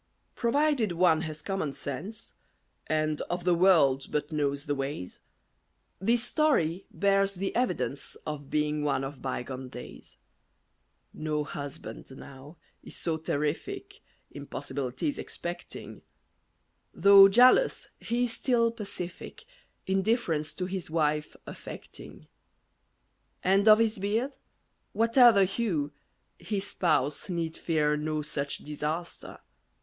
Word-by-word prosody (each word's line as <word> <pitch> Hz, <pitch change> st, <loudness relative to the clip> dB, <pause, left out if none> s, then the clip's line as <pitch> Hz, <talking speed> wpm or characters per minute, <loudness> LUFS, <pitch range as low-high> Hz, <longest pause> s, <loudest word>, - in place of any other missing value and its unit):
Provided 255 Hz, -, +1 dB
one 165 Hz, -2 st, +4 dB
has 155 Hz, -2 st, -6 dB
common 195 Hz, -8 st, -2 dB
sense, 185 Hz, -, -6 dB, 0.5 s
And 155 Hz, -1 st, 0 dB
of 175 Hz, 0 st, -2 dB
the 180 Hz, 0 st, +3 dB
world 165 Hz, -7 st, +4 dB
but 150 Hz, 0 st, -2 dB
knows 140 Hz, -2 st, -1 dB
the 145 Hz, -, 0 dB
ways, 135 Hz, -9 st, -4 dB, 0.8 s
This 230 Hz, +4 st, +2 dB
story 195 Hz, -, +1 dB
bears 195 Hz, +2 st, +2 dB
the 195 Hz, +2 st, -3 dB
evidence 140 Hz, -, -1 dB
Of 145 Hz, -2 st, -5 dB
being 150 Hz, 0 st, 0 dB
one 145 Hz, -2 st, 0 dB
of 135 Hz, 0 st, -6 dB
bygone 130 Hz, 0 st, -4 dB
days. 125 Hz, -1 st, -11 dB, 1.0 s
No 155 Hz, -1 st, -2 dB
husband 145 Hz, +1 st, -7 dB
now 140 Hz, +4 st, -12 dB, 0.2 s
is -, -, -11 dB
so 165 Hz, -2 st, -1 dB
terrific, 345 Hz, -, -3 dB, 0.3 s
Impossibilities, 140 Hz, -, -4 dB
expecting: 175 Hz, 0 st, -7 dB, 0.9 s
Though 200 Hz, 0 st, +9 dB
jealous, 250 Hz, -, +5 dB
he 240 Hz, +1 st, 0 dB
is 240 Hz, -, -3 dB
still 230 Hz, -1 st, +2 dB
pacific, 200 Hz, -, -7 dB, 0.4 s
Indifference 190 Hz, -5 st, 0 dB
to 180 Hz, -, -3 dB
his 185 Hz, -2 st, -4 dB
wife 150 Hz, -2 st, 0 dB
affecting. -, -, -10 dB, 1.2 s
And 195 Hz, +3 st, +3 dB
of 215 Hz, 0 st, +9 dB
his 220 Hz, -2 st, +1 dB
beard, 225 Hz, +8 st, -1 dB, 0.6 s
whate'er 235 Hz, +2 st, +6 dB
the 200 Hz, -3 st, +4 dB
hue, 180 Hz, -8 st, -1 dB, 0.5 s
His 200 Hz, -2 st, -3 dB
spouse 155 Hz, -5 st, 0 dB
need 165 Hz, -2 st, -2 dB
fear 150 Hz, -3 st, +1 dB
no 155 Hz, 0 st, -2 dB
such 145 Hz, -1 st, -2 dB
disaster. 150 Hz, +3 st, -4 dB
170 Hz, 115 wpm, -28 LUFS, 150-205 Hz, 1.2 s, Though